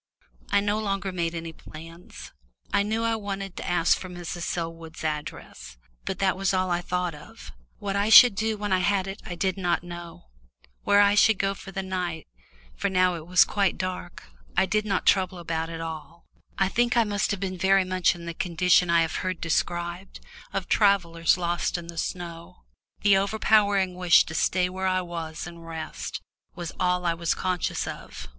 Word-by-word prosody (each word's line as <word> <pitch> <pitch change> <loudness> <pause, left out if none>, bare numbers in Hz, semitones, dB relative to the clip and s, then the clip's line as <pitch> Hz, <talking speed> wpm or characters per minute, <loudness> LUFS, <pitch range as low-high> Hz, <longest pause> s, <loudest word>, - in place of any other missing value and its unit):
I 200 0 +3
no 205 +1 0
longer 195 -2 -2
made 170 -2 -2
any 165 0 -6
plans. 165 +3 -12 0.4
I - - +4
knew 220 +3 -1
I 230 0 +1
wanted 195 -3 -5
to - - -4
ask 175 -1 +3
for 185 - -8
Mrs. 175 -1 -6
Selwood's 165 -1 -5
address, 150 - -5 0.3
but - - -3
that 195 -1 +1
was 195 0 0
all 185 -1 0
I 175 0 +1
thought 180 -1 -2
of. 150 0 -12 0.3
What 200 -1 -3
I 200 +2 +1
should 240 +1 +10
do 220 +2 -1
when 205 -1 -2
I 185 - +3
had 190 0 +1
got 195 - -4
it 195 - -11
I 175 - -5
did 190 +2 -1
not 175 -2 0
know; 175 -1 -9 0.6
where 205 0 +5
I 200 0 +5
should 220 0 +5
go 195 0 0
for 195 0 -11
the 195 0 -4
night, 180 -4 -3 0.5
for - - -1
it 180 -3 +1
was 180 +1 +6
now - - -11
quite 200 -4 +1
dark, 185 0 -5 0.3
I - - +5
did 215 +2 0
not 195 -2 0
trouble 185 -1 +3
about 165 -1 -3
in 165 - -6
the 165 - -5
least. 160 +2 -12 0.4
I 195 - +3
think 240 +4 +1
I 235 - +6
must 205 -1 -1
have 200 - -1
been 185 -1 -4
very 190 +1 +4
much 185 -2 +2
in 170 -1 -10
the 170 - -4
condition 180 +1 +2
I 170 -1 +4
have 165 - -3
heard 185 -1 -3
described, 175 +2 -2 0.3
of - - -3
travellers 175 -6 +3
lost 175 0 -1
in 170 - -7
the 170 0 -10
snow 170 0 -6 0.4
the 200 -1 +5
overpowering 200 -1 +2
wish 180 -2 +5
to 160 - -8
stay 180 +4 +1
where 190 +1 -3
I 185 0 +1
was 165 -3 -6
and 170 -1 -10
rest, 165 -1 -6 0.3
was 175 -2 -5
all 180 0 +1
I 170 - +2
was 165 0 -1
conscious 185 -2 -1
of. - - -8
180 Hz, 200 wpm, -26 LUFS, 170-195 Hz, 0.6 s, should